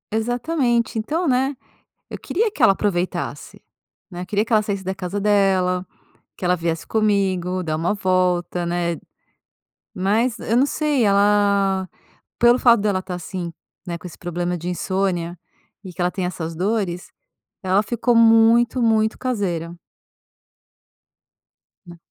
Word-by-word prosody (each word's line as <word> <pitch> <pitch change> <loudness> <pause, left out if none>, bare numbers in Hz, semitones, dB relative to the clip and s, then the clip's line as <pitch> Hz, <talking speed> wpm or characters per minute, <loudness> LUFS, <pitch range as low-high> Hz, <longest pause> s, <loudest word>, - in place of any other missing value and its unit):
Exatamente. 240 0 0
Então, 320 +10 -1
né, 265 +1 +1 0.5
eu - - -6
queria 440 +4 -1
que - - -5
ela - - +7
aproveitasse, 185 -3 -3 0.5
né. 175 -1 -6
Eu - - -7
queria 205 +2 0
que 230 - -6
ela 215 - +5
saísse 200 -2 -4
da 190 +1 -2
casa 190 +1 -4
dela, 190 -3 +2 0.5
que - - -5
ela 180 0 +3
viesse 165 -1 -3
comigo, 190 -4 0
dar 155 -3 -2
uma 165 +5 0
volta, 180 -2 0
né. 170 0 -1 1.0
Mas 220 +6 0
eu 230 - -1
não 265 - +4
sei, 290 -5 0
ela 200 -1 +2 0.5
pelo 240 +1 +5
fato 235 -2 +6
dela 200 -3 0
tá 185 -1 -7
assim, 175 0 -5 0.3
né, 170 -1 -4
com 180 - -10
esse 170 - -10
problema 175 0 -3
de 175 +2 -6
insônia 180 -1 -2 0.5
e 185 - -8
que 175 - -10
ela 175 0 +2
tem 185 -2 -2
essas 165 -2 -5
dores, 185 -1 -2 0.5
ela 190 +2 +2
ficou 235 +3 0
muito 230 +2 +5
muito 220 -1 +2
caseira. 185 -10 -2 2.1
Na 175 -1 -12
195 Hz, 145 wpm, -21 LUFS, 180-225 Hz, 2.1 s, ela